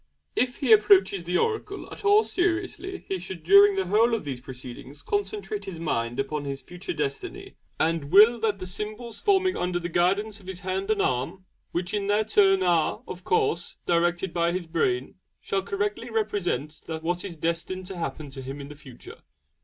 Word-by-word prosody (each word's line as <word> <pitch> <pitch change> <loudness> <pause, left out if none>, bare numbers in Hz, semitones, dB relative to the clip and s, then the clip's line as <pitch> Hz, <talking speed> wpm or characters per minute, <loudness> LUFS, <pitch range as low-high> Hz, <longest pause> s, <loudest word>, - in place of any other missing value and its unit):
If 250 +1 +1
he 260 -5 0
approaches 200 -4 +5
the 180 +1 +1
oracle 425 -3 -2
at - - -9
all 415 +1 +6
seriously 370 +1 -2
he 190 - -2
should 185 0 -7
during 400 +1 +7
the 385 - 0
whole 230 +3 +3
of 225 - -4
these 135 -4 -5
proceedings 130 +2 -10
concentrate 410 0 -3
his 175 -4 -7
mind 120 -6 -2
upon 145 +2 -2
his 140 -1 -5
future 180 +6 -7
Destiny, 145 -3 -4 0.3
and 165 -2 +1
'will' 215 +5 +7
that 215 -2 0
the 185 - -6
symbols 215 +5 -5
forming 380 -2 +2
under 180 0 -1
the 175 0 -3
guidance 195 +5 +1
of 185 - -16
his 190 -1 -6
hand 190 +1 -2
and 215 -2 +2
arm 140 +10 -2 0.3
(which 175 +2 -2
in 205 -1 -1
their 205 +1 +3
turn 195 -3 +4
are, 170 -3 +1
of 180 0 -7
course, 175 -1 0
directed 175 +1 +1
by 170 0 +2
his 180 -1 -2
brain) 135 - -1 0.2
shall 195 - -1
correctly 205 +4 -2
represent 195 - -2 0.2
what 175 +2 -2
is 185 -4 -6
destined 170 +3 -2
to 185 0 -7
happen 145 -2 -5
to 135 0 -7
him 135 +2 -7
in 140 0 -8
the 150 - -9
future. 130 -4 -13
185 Hz, 185 wpm, -26 LUFS, 165-215 Hz, 0.3 s, during